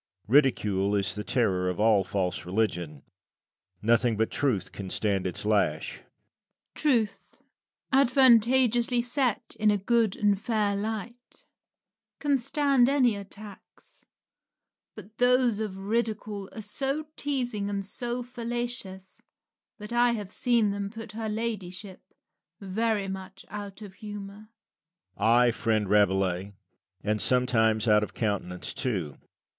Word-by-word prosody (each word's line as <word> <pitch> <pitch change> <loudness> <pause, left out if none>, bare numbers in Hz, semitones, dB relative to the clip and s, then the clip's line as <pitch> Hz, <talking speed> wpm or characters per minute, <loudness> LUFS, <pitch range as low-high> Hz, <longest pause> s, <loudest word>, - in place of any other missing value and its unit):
Ridicule 105 -7 +3
is 100 -2 0
the 105 +2 -5
terror 95 -6 +1
of 90 - -4
all 105 -2 +4
false 95 -1 -2
religion. 90 -7 -2 0.8
Nothing 115 0 +3
but 110 +1 0
truth 105 -10 -1
can 100 -2 -7
stand 100 -2 0
its 90 - -6
lash. 100 -8 0
Rabelais. - - -27 0.7
Truth, 235 -9 -1 0.5
advantageously 245 -2 +4
set 245 -2 -1
in 215 -1 +4
a 205 - +3
good 225 +1 +1
and 205 -2 +1
fair 215 -3 0
light, 220 +4 -6 0.7
can 285 -2 +2
stand 270 0 +3
any 255 -6 +3
attacks; 200 0 -12 0.9
but 215 +2 -13
those 245 -3 +3
of 210 -3 -4
Ridicule 210 -1 -2
are 220 - -7
so 275 +8 -2
teasing 245 -8 -2
and 200 -1 -3
so 240 +4 -3
fallacious 240 -5 -5 0.6
that 210 +1 -7
I 240 0 +4
have 205 -4 -5
seen 235 -4 +2
them 200 0 -3
put 225 0 -9
her 220 0 -4
ladyship 205 -4 -4 0.6
very 210 +1 -1
much 190 0 -8
out 205 0 -7
of 200 -2 -10
humour. 205 0 -9
Lucian. - - -38 0.7
Ay, 120 +3 +4
friend 110 -2 0
Rabelais, 95 -1 +2 0.5
and 105 0 0
sometimes 115 -3 +2
out 105 -1 +5
of 105 - -5
countenance 100 -5 -3
too. 95 - -3
200 Hz, 125 wpm, -27 LUFS, -, 0.9 s, out